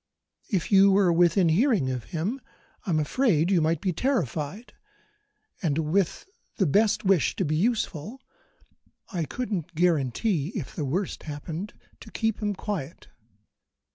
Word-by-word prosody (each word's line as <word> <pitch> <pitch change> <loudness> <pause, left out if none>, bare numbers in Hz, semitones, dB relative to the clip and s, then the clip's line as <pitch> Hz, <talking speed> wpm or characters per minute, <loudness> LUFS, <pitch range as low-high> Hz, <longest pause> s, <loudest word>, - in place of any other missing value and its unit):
If 190 -1 -1
you 195 0 +7
were 190 -3 +4
within 175 +1 +4
hearing 190 - +2
of 125 -3 -4
him, 185 - -3 0.5
I'm 165 -4 +2
afraid 170 - +2
you 180 -4 +4
might 160 0 +1
be 185 -2 0
terrified, 195 - -2 0.9
and, 155 -6 0
with 160 +4 0 0.3
the 195 - +2
best 205 +8 +2
wish 190 -6 +3
to 190 - -1
be 155 +1 0
useful, 215 - -1 0.9
I 170 -3 -1
couldn't 185 -7 -4
guarantee 165 - +1
(if 175 - -5
the 150 - -2
worst 180 +8 -2
happened) 160 +7 -6 0.2
to - - -12
keep 225 0 -1
him 205 -1 -1
quiet. 180 -7 -5
180 Hz, 140 wpm, -26 LUFS, 155-205 Hz, 0.9 s, you